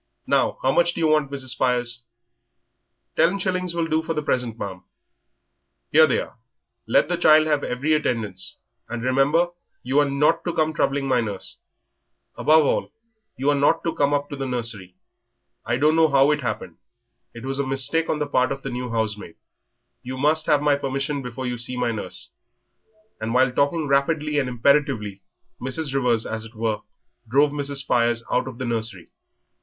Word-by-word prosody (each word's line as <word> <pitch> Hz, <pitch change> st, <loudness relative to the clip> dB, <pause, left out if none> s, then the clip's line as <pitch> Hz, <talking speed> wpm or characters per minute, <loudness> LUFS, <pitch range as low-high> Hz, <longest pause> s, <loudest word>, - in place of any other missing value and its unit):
Now, -, -, +1 dB
how 130 Hz, -, +3 dB
much 170 Hz, +4 st, +2 dB
do -, -, -4 dB
you 165 Hz, -, +2 dB
want, 155 Hz, -2 st, +2 dB
Mrs. 135 Hz, -2 st, -3 dB
Spires?" 120 Hz, -2 st, 0 dB, 1.1 s
"Ten 180 Hz, +4 st, +3 dB
shillings 185 Hz, -2 st, -2 dB
will 170 Hz, -1 st, 0 dB
do 160 Hz, 0 st, +1 dB
for 165 Hz, 0 st, -3 dB
the 150 Hz, -, -2 dB
present, 125 Hz, -5 st, -1 dB
ma'am." 95 Hz, -4 st, -6 dB, 1.1 s
"Here 155 Hz, +1 st, +7 dB
they 130 Hz, -, +1 dB
are; -, -, -8 dB, 0.5 s
let -, -, +3 dB
the 175 Hz, +1 st, -1 dB
child 155 Hz, -2 st, +6 dB
have 150 Hz, -2 st, +1 dB
every 140 Hz, +6 st, 0 dB
attendance, 110 Hz, -10 st, -2 dB, 0.3 s
and 120 Hz, 0 st, -4 dB
remember 135 Hz, +7 st, +2 dB, 0.3 s
you 130 Hz, +4 st, +2 dB
are 145 Hz, -1 st, +3 dB
not 150 Hz, +4 st, +2 dB
to 175 Hz, -, -1 dB
come 155 Hz, 0 st, +1 dB
troubling 140 Hz, -2 st, 0 dB
my 125 Hz, -2 st, +2 dB
nurse. 105 Hz, -4 st, -5 dB, 0.8 s
Above 155 Hz, 0 st, +4 dB
all, -, -, 0 dB, 0.5 s
you 140 Hz, +3 st, +2 dB
are -, -, +2 dB
not 145 Hz, +4 st, +2 dB
to 165 Hz, -, -1 dB
come 140 Hz, 0 st, +1 dB
up 145 Hz, 0 st, 0 dB
to -, -, -3 dB
the 135 Hz, -1 st, -4 dB
nursery. 115 Hz, -7 st, -4 dB, 0.7 s
I 120 Hz, +1 st, +1 dB
don't 150 Hz, +4 st, +3 dB
know 165 Hz, -1 st, +5 dB
how 140 Hz, +1 st, +4 dB
it 150 Hz, -, +1 dB
happened, 110 Hz, -, -4 dB, 0.6 s
it 115 Hz, +2 st, -8 dB
was 135 Hz, +1 st, -2 dB
a 140 Hz, -, -1 dB
mistake 135 Hz, +5 st, +1 dB
on -, -, +1 dB
the 150 Hz, -, -1 dB
part 130 Hz, -2 st, +1 dB
of 135 Hz, 0 st, -5 dB
the 135 Hz, -, -4 dB
new 125 Hz, 0 st, -4 dB
housemaid. 110 Hz, -5 st, -3 dB, 0.7 s
You 130 Hz, +1 st, -6 dB
must 155 Hz, +3 st, +2 dB
have 145 Hz, -1 st, +3 dB
my 145 Hz, -1 st, +3 dB
permission 140 Hz, +1 st, -2 dB
before 125 Hz, +1 st, -6 dB
you 125 Hz, -1 st, -3 dB
see 125 Hz, +1 st, -5 dB
my 125 Hz, -1 st, 0 dB
nurse." 110 Hz, -2 st, -4 dB, 0.9 s
And 110 Hz, +2 st, -3 dB
while 130 Hz, 0 st, +4 dB
talking 145 Hz, +5 st, +1 dB
rapidly 145 Hz, +2 st, +1 dB
and 130 Hz, -2 st, -1 dB
imperatively 120 Hz, -6 st, +1 dB, 0.4 s
Mrs. 135 Hz, +3 st, -2 dB
Rivers, 125 Hz, -4 st, +1 dB
as 110 Hz, 0 st, -3 dB
it 115 Hz, +1 st, -12 dB
were, 110 Hz, -1 st, -1 dB, 0.5 s
drove 140 Hz, +4 st, +4 dB
Mrs. 145 Hz, -1 st, -3 dB
Spires 120 Hz, -2 st, +1 dB
out 125 Hz, +1 st, +1 dB
of 130 Hz, -3 st, -7 dB
the 130 Hz, -, -4 dB
nursery. 110 Hz, -6 st, -3 dB
135 Hz, 185 wpm, -23 LUFS, 120-150 Hz, 1.1 s, Here